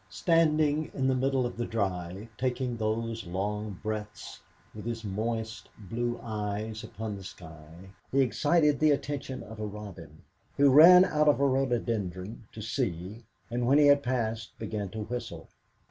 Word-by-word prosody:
Standing 155 -2 +2
in 135 - -1
the 130 - +3
middle 130 0 +1
of 120 - -5
the 120 - -1
drive, 95 -2 -3
taking 125 0 -1
those 115 -1 -2
long 105 +2 -3
breaths, 105 -1 -5 0.3
with 105 - -8
his 115 -1 -4
moist 110 +2 -3
blue 120 +4 -3
eyes 110 0 -4
upon 110 -1 -5
the 100 - -9
sky, 80 +1 -12 0.2
he 135 - +3
excited 150 +3 +2
the 155 - +4
attention 140 -2 -2
of 110 0 -11
a 105 - -2
robin, 105 -2 -10 0.3
who 140 -1 +6
ran 180 +5 +9
out 150 -3 +1
of 145 - +4
a 140 - +3
rhododendron 115 -7 -1
to 110 - -8
see, 105 -3 -3 0.3
and 120 0 -1
when 140 +3 +5
he 150 - +6
had 145 0 +6
passed 115 -4 -2
began 105 -3 -4
to 110 +3 -5
whistle. 120 +3 -6
115 Hz, 160 wpm, -29 LUFS, 105-135 Hz, 0.3 s, ran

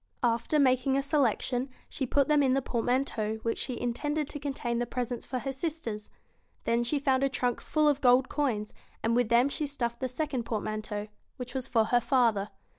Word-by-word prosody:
After 235 +5 +2
making 265 -1 +3
a 275 - +1
selection, 265 -2 +1 0.2
she 265 - -3
put 280 +2 +2
them 300 -1 +4
in 265 -2 +3
the 270 - +2
portmanteau 235 -3 0
which 230 - -1
she 250 -3 -3
intended 295 +5 -1
to 290 - -5
contain 265 -4 -2
the 240 - -1
presents 245 0 -3
for 255 - -2
her 270 +2 -3
sisters. 270 -7 -4 0.5
Then 235 +1 +1
she 265 +5 0
found 270 -2 +2
a 275 - +3
trunk 245 -2 -1
full 305 -1 +1
of 290 -1 +2
gold 255 +1 +5
coins, 240 -8 -1 0.3
and 230 +1 +2
with 245 -2 +2
them 240 +3 +5
she 290 +1 -2
stuffed 235 -4 -3
the 260 - -2
second 265 -1 -2
portmanteau, 215 -1 -3 0.3
which 250 -1 -6
was 265 -1 -3
for 225 -4 +3
her 240 +2 +3
father. 230 -5 +2
250 Hz, 195 wpm, -29 LUFS, 235-275 Hz, 0.5 s, gold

